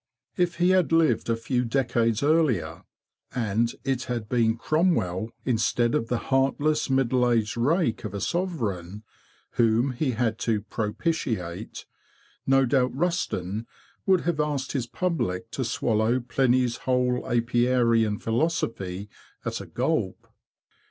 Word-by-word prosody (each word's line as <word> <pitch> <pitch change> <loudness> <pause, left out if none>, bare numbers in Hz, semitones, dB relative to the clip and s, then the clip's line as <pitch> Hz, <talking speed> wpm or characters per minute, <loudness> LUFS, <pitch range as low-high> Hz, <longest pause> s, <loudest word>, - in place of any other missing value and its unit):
If 175 -1 +1
he 175 +1 +2
had 185 -3 +3
lived 160 -9 +3
a 115 - +3
few 125 +2 -1
decades 115 -2 +1
earlier, 150 - +1 0.5
and 115 0 +1
it 130 -1 -1
had 120 -3 -3
been 115 -1 +2
Cromwell, 115 - +1 0.2
instead 120 0 +1
of 115 - 0
the 120 - 0 0.2
heartless, 145 +3 +2
middle 130 -2 +2
aged 115 -3 +1
rake 145 +2 +1
of 105 -2 -5
a - - -2
sovereign, 105 - -3 0.6
whom 115 +4 +3
he 130 +1 -1
had 115 -1 -1
to 110 -3 0
propitiate, 105 - -3 0.6
no 135 0 +4
doubt 130 0 +1
Rusden 115 - -1 0.4
would 190 -2 +4
have 165 -2 -1
asked 145 -3 -1
his 130 -4 -2
public 115 - -2
to 130 - -2
swallow 115 0 +1
Pliny's 125 -1 +1
whole 125 -1 0
apiarian 120 -2 +2
philosophy 110 - -2 0.4
at - - -3
a - - -9
gulp. - - -2
120 Hz, 130 wpm, -26 LUFS, 115-140 Hz, 0.6 s, no